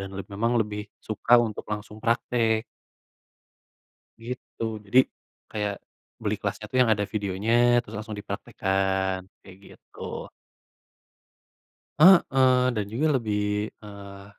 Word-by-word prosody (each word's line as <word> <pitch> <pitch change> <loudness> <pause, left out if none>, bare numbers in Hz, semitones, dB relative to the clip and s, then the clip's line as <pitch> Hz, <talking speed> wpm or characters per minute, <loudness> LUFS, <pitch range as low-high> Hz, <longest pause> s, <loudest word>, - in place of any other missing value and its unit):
Dan 95 0 -7
le 100 - -5
memang 115 +4 +1
lebih 105 -1 -2 0.2
suka 110 +3 +3
untuk 115 -3 -1
langsung 105 0 -6
praktek. 115 -1 +1 1.6
Gitu, 125 -1 -7 0.2
jadi, 125 +6 +5 0.5
kayak 105 -1 -1 0.5
beli - - 0
kelasnya - - -3
tuh 130 - 0
yang 115 -3 +4
ada 105 -1 -1
videonya, 100 +1 -1 0.3
terus 110 -2 -11
langsung 110 -1 -6
dipraktekkan, 95 -1 -1 0.2
kayak 95 -1 -14
gitu. - - -18 2.0
Heeh, 180 +5 +9 0.6
dan 105 -2 -1
juga 140 +8 +1
lebih, 105 -2 -1
eee, 100 -1 -10
105 Hz, 115 wpm, -26 LUFS, 100-115 Hz, 2.0 s, Heeh